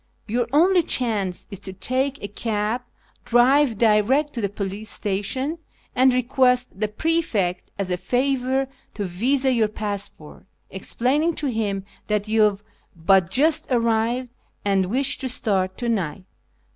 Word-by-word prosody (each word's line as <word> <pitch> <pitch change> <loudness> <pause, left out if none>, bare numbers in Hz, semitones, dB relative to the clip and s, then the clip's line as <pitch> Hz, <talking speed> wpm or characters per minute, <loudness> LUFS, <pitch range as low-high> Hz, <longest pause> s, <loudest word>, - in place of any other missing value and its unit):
Your 235 +2 0
only 350 +5 +5
chance 210 - -1
is 200 - -5
to 195 -1 -6
take 260 +7 -1
a - - -2
cab, 215 +2 -2 0.4
drive 245 0 +4
direct 235 +7 +3
to 235 - -3
the 200 - 0
police 205 +2 -5
station, 260 - -2 0.4
and 260 +1 +5
request 250 -3 +2
the 215 - +1
prefect 215 - -1
as 195 -2 -3
a 180 - +1
favour 260 +5 0 0.3
to 205 - -2
visa 255 +9 +1
your 225 -3 +3
passport, 200 -7 -6 0.2
explaining 275 - 0
to 285 -3 -2
him 200 -4 -2 0.2
that 210 -1 0
you 220 0 +2
have 210 -1 +2 0.3
but 175 +1 +3
just 310 +7 +2
arrived 235 +1 +1 0.3
and 195 -2 +2
wish 260 +7 0
to 260 - -3
start 190 -6 0
to 240 - -3
night." 190 -6 -1
225 Hz, 145 wpm, -23 LUFS, 200-260 Hz, 0.4 s, only